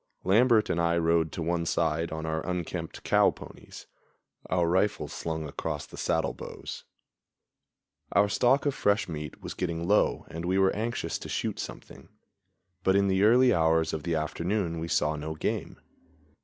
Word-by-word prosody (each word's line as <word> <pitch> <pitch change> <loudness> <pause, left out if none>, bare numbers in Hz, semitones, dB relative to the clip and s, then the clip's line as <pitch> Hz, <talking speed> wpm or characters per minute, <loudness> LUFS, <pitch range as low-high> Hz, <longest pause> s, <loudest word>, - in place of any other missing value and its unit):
Lambert 110 +3 +4
and 85 - 0
I 85 0 +2
rode 85 -1 +2
to 85 - -3
one 85 +1 0
side 80 +1 0
on 80 0 -4
our 80 0 -2
unkempt 90 -2 -4
cow - - +4
ponies, - - -11 0.6
our 90 -2 +2
rifles 95 +4 0
slung 80 -2 -4
across 75 +1 -4
the - - -13
saddle - - 0
bows. - - -8 1.3
Our 100 0 +5
stock 125 +7 +2
of 145 - +2
fresh 105 -4 +1
meat 75 -4 -7
was - - -5
getting 85 -2 -3
low 105 +2 +2
and 85 +1 -5
we 90 +2 +1
were 95 0 +3
anxious 115 +3 -2
to - - -8
shoot - - -2
something; 70 +1 -9 0.7
but 95 - +3
in 100 0 +3
the 95 0 +2
early 125 +4 +6
hours 80 0 +2
of 80 - -2
the 85 +1 -1
afternoon 85 +3 -1
we 80 - -4
saw 75 -2 +1
no 75 +1 -5
game. - - -3
85 Hz, 170 wpm, -28 LUFS, 80-100 Hz, 1.3 s, early